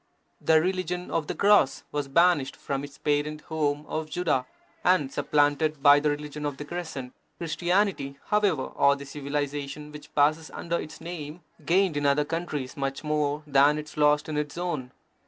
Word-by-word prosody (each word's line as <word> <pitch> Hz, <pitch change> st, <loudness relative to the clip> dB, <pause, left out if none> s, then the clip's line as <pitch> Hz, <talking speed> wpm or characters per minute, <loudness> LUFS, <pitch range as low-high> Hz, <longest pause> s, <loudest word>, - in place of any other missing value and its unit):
The 160 Hz, -1 st, +5 dB
religion 180 Hz, 0 st, -2 dB
of 160 Hz, -2 st, -1 dB
the -, -, -3 dB
Cross 200 Hz, -9 st, +4 dB
was 145 Hz, -1 st, -2 dB
banished 170 Hz, -2 st, +3 dB
from 140 Hz, 0 st, -4 dB
its 140 Hz, -1 st, -9 dB
parent 150 Hz, +1 st, -1 dB
home 150 Hz, -2 st, -1 dB
of 155 Hz, 0 st, -3 dB
Judaea 155 Hz, -7 st, 0 dB, 0.4 s
and 165 Hz, -7 st, +3 dB
supplanted 145 Hz, 0 st, +1 dB
by 145 Hz, 0 st, +8 dB
the 150 Hz, +1 st, +1 dB
religion 150 Hz, 0 st, -4 dB
of 145 Hz, -2 st, -3 dB
the 145 Hz, -, -6 dB
Crescent. 145 Hz, -6 st, -6 dB, 0.2 s
Christianity, 170 Hz, -3 st, 0 dB
however, 205 Hz, -9 st, +2 dB
or 140 Hz, 0 st, +3 dB
the 140 Hz, 0 st, -9 dB
civilization 145 Hz, +1 st, -4 dB
which 150 Hz, 0 st, -11 dB
passes 155 Hz, +2 st, +3 dB
under 170 Hz, 0 st, -2 dB
its 155 Hz, -, -10 dB
name, 165 Hz, -1 st, -7 dB, 0.3 s
gained 185 Hz, -1 st, +3 dB
in 145 Hz, -1 st, +1 dB
other 145 Hz, +1 st, +3 dB
countries 155 Hz, -5 st, -4 dB
much 135 Hz, 0 st, -3 dB
more 150 Hz, 0 st, 0 dB
than 145 Hz, +1 st, +4 dB
it 150 Hz, 0 st, -7 dB
lost 150 Hz, 0 st, +3 dB
in 155 Hz, -1 st, -3 dB
its 150 Hz, +2 st, -3 dB
own. 165 Hz, -8 st, -3 dB
150 Hz, 170 wpm, -27 LUFS, 145-165 Hz, 0.4 s, by